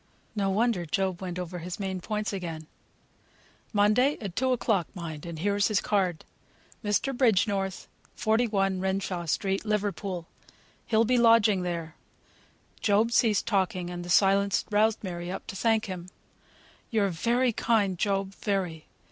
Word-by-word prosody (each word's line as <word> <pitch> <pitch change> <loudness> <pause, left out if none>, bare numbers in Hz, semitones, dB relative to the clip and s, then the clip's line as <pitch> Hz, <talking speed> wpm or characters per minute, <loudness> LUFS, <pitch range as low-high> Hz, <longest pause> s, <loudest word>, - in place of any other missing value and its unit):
No 200 -2 +1
wonder 215 -2 +1
Job 190 +2 -1
went 180 -2 -4
over 180 0 -5
his 175 +3 -6
main 190 -2 -3
points 210 +2 -3
again: 165 -5 -5 1.1
"Monday; 215 +7 +3
at 195 -5 -6
two 260 +1 +1
o'clock, 220 -7 +1
mind; 165 -3 -6
and 170 -1 -6
here's 200 +4 +1
his 215 -2 +2
card. 185 -5 0 0.6
'Mr. 215 +6 0
Bridgenorth, 200 -5 +1 0.3
41, 210 -4 +1
Renshaw 190 -2 -2
Street, 195 +4 0
Liverpool.' 200 -4 -2 0.6
He'll 225 0 +3
be 250 +2 +3
lodging 225 -4 +5
there." 170 -3 -4 0.9
Job 215 +2 +2
ceased 220 -3 +3
talking, 185 -4 0
and 175 0 -5
the 175 - -8
silence 195 +2 +3
roused 215 +1 +2
Mary 175 -2 -5
up 190 - -6
to - - -7
thank 220 +2 +2
him. 185 -2 -6 0.8
"You're 210 -3 +2
very 235 +8 +1
kind, 210 -4 +1
Job; 195 -1 0
very. 185 -7 -3
195 Hz, 140 wpm, -28 LUFS, 180-215 Hz, 1.1 s, lodging